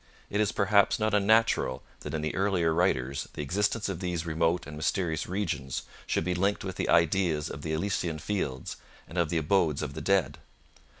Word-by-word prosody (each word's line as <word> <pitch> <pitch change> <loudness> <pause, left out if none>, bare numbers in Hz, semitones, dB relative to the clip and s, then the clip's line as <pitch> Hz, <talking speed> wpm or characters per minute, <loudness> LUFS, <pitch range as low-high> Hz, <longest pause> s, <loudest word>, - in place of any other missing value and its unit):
It 105 - +1
is, 105 - +2
perhaps, 100 0 +3
not 110 -1 0
unnatural 105 - +3 0.2
that - - -5
in 75 - -2
the 75 - -1
earlier 95 -4 +1
writers 70 -5 0
the - - -4
existence 105 +8 0
of 95 -4 -3
these 90 -3 -2
remote 85 +1 +1
and 70 +1 -8
mysterious 80 +1 -1
regions 80 -9 -2 0.2
should - - 0
be 90 +2 0
linked 100 +3 0
with 95 -2 -5
the - - -1
ideas 85 -2 +2
of 70 - -7
the 80 - -4
Elysian 85 -1 -1
Fields 70 -7 -3 0.3
and 85 - -4
of 85 -3 +2
the 85 - 0
abodes 80 -2 +2
of 70 - -4
the 80 - -6
dead. 95 +3 +1
85 Hz, 190 wpm, -29 LUFS, 75-100 Hz, 0.3 s, perhaps